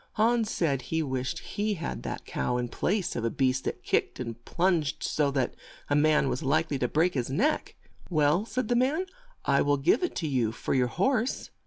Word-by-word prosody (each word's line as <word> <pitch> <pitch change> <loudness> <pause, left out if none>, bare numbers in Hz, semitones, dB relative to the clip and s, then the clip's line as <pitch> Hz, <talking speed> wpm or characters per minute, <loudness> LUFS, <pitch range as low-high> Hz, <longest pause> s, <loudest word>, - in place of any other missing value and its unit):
Hans 225 0 +2
said 140 -10 0
he 160 +5 -1
wished 130 -2 -2
he 210 0 -2
had 170 - -4
that - - -5
cow 65 - -1
in 120 -1 -2
place 195 - -1
of - - -2
a 115 - +1
beast 130 +1 0
that - - -3
kicked - - 0
and 115 -2 -6
plunged 170 - +1
so 150 -2 +1
that 135 -3 0 0.4
a - - +4
man 150 -1 +4
was 130 - -1
like 140 0 +1
ly 140 - +1
to 125 - 0
break 165 +7 +2
his 125 -3 -2
neck. 255 - 0 0.3
"Well," 155 +2 +3
said 220 +2 -2
the 245 - +1
man, 280 +9 +2 0.4
"I 140 0 +3
will 145 0 +2
give 165 - +3
it 355 - -2
to 160 - -2
you 120 -6 +1
for - - -2
your 125 -2 +3
horse." 235 - 0
150 Hz, 210 wpm, -28 LUFS, 130-205 Hz, 0.4 s, a